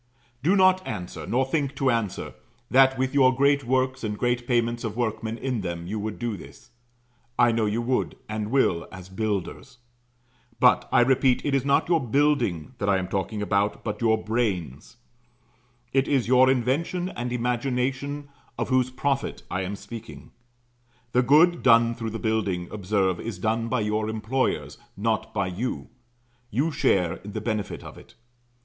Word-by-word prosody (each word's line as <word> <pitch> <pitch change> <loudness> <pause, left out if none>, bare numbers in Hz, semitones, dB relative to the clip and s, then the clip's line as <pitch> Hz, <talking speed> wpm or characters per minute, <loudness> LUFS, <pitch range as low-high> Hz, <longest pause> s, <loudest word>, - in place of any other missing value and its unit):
Do 175 +8 +3
not 185 -1 +5
answer, 90 -1 -6
nor 130 +2 +1
think 140 0 -1
to 135 -1 +2
answer, 115 -5 -2 0.4
that 135 0 +5
with 130 +1 -1
your 130 -2 +5
great 140 +1 +3
works 130 +1 0
and 105 -1 -3
great 120 +1 -1
payments 120 -1 0
of 110 -1 -4
workmen 110 -1 -2
in 125 -3 -2
them, 85 -2 -4
you 105 +4 -4
would 105 0 -4
do 120 -3 -3
this; 95 - -14 0.7
I 120 -1 +5
know 115 -1 +1
you 110 +3 -1
would, 125 +1 -1
and 105 0 -3
will, 100 -10 +1
as 95 -1 -10
Builders; 105 +3 -4 0.8
but, 125 0 +4
I - - +5
repeat, 130 0 +3
it 145 - 0
is 135 -2 +2
not 140 0 +2
your 170 -1 +3
building 125 - +1
that 100 - 0
I 100 - +4
am 90 -1 -3
talking 100 +2 -2
about, 100 0 0
but 105 0 -4
your 110 -1 +3
brains; 105 - -3 1.0
it 135 0 +2
is 135 -5 +1
your 130 +1 +5
invention 140 +8 0
and 120 -8 -5
imagination 130 +4 -2 0.3
of - - -2
whose 130 -1 +2
profit 135 +1 -2
I 95 - -1
am 95 +2 -3
speaking. 115 +2 -10 0.8
The 125 - +3
good 160 +7 +5
done 115 -1 +5
through 115 -1 -4
the 110 - -4
building, 105 -6 -1
observe, 95 -3 0
is 115 -4 -5
done 110 +4 -1
by 120 0 0
your 105 +1 -1
employers, 115 +5 -2 0.2
not 110 +2 -1
by 100 - -1
you 95 +8 -4 0.6
you 140 +8 0
share 90 - +1
in 100 0 -10
the 110 - -2
benefit 110 -1 -3
of - - -10
it. - - -18
115 Hz, 170 wpm, -25 LUFS, 105-130 Hz, 1.0 s, not